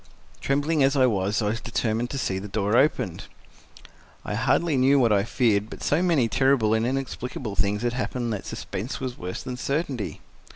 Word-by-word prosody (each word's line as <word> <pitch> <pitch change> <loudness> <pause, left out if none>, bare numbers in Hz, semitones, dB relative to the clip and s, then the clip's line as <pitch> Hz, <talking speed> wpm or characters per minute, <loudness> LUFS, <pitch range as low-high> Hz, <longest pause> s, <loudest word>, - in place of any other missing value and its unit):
Trembling 145 +3 +1
as 135 +1 +4
I 130 -2 +5
was, 100 -2 +1
I 105 - +1
was 110 +1 -2
determined 120 0 -1
to 140 - -4
see 95 -7 -1
that 100 +1 -8
door 105 +1 +1
opened. 105 - +1 1.0
I - - -3
hardly 135 +8 +1
knew 135 +2 +4
what 120 -4 +4
I 100 -2 +3
feared, 110 -3 +1
but - - -9
so 150 +4 +2
many 165 -10 +3
terrible 130 -3 +3
and 110 +1 +1
inexplicable 125 -4 -4
things 100 +4 0
had 120 0 0
happened 125 -2 -2
that 100 - -5
suspense 110 +8 -5
was 130 -2 -4
worse 90 +1 -6
than 125 -1 -5
certainty. 135 -4 -2
120 Hz, 190 wpm, -25 LUFS, 105-135 Hz, 1.0 s, I